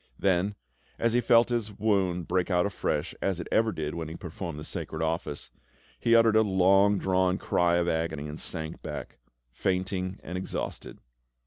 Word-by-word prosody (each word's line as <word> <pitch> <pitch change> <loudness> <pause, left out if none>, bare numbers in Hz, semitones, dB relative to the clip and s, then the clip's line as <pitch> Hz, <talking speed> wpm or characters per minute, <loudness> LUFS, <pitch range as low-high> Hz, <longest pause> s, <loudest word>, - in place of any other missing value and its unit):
Then, 95 +2 +1 0.4
as 115 0 +1
he 120 - +3
felt 120 -1 +5
his 115 -3 -1
wound 95 -5 +1
break 90 0 0
out 90 -1 +3
afresh, 100 - -2
as 95 -3 0
it 85 - -5
ever 110 0 +3
did 75 -5 -4
when 85 -2 -4
he 80 - -7
performed 85 -2 -6
the 75 - -6
sacred 80 +1 -3
office, 80 -2 -3 0.5
he 115 0 +4
uttered 115 -1 +5
a 110 - +6
long 100 0 +4
drawn 95 -1 +1
cry 85 -2 +2
of 85 0 +1
agony 80 -3 -1
and 75 +1 -6
sank 80 -1 -3
back, - - -7 0.3
fainting 95 +5 -2
and 90 +1 -4
exhausted. 95 - -5
95 Hz, 175 wpm, -28 LUFS, 85-100 Hz, 0.5 s, a